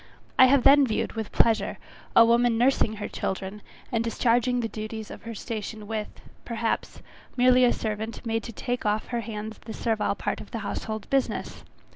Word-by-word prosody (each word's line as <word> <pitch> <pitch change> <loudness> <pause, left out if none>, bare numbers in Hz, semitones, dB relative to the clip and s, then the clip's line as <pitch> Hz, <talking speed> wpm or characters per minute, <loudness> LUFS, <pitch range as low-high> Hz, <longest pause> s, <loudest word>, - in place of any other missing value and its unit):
I 260 - +10
have 260 0 +4
then 280 0 +7
viewed 215 - -1
with 220 -2 -5
pleasure 225 -1 +2 0.4
a 230 - +9
woman 235 0 +3
nursing 245 -2 +3
her 210 -1 -5
children, 190 +2 -4 0.3
and 230 -2 +1
discharging 245 +1 +2
the 230 - -1
duties 215 0 -6
of - - -9
her 230 -1 -6
station 215 -1 -5
with, 215 0 -3 0.4
perhaps, 230 -1 -3 0.3
merely 250 0 +5
a 245 - +5
servant 220 +2 -4
made 225 0 0
to 230 - -6
take 245 +2 -3
off 210 +1 0
her 240 -1 -1
hands 215 0 -6
the 220 - -8
servile 220 -3 0
part - - -3
of - - -12
the 235 - -4
household 215 0 -4
business. 270 -1 -1
225 Hz, 180 wpm, -26 LUFS, 215-245 Hz, 0.4 s, I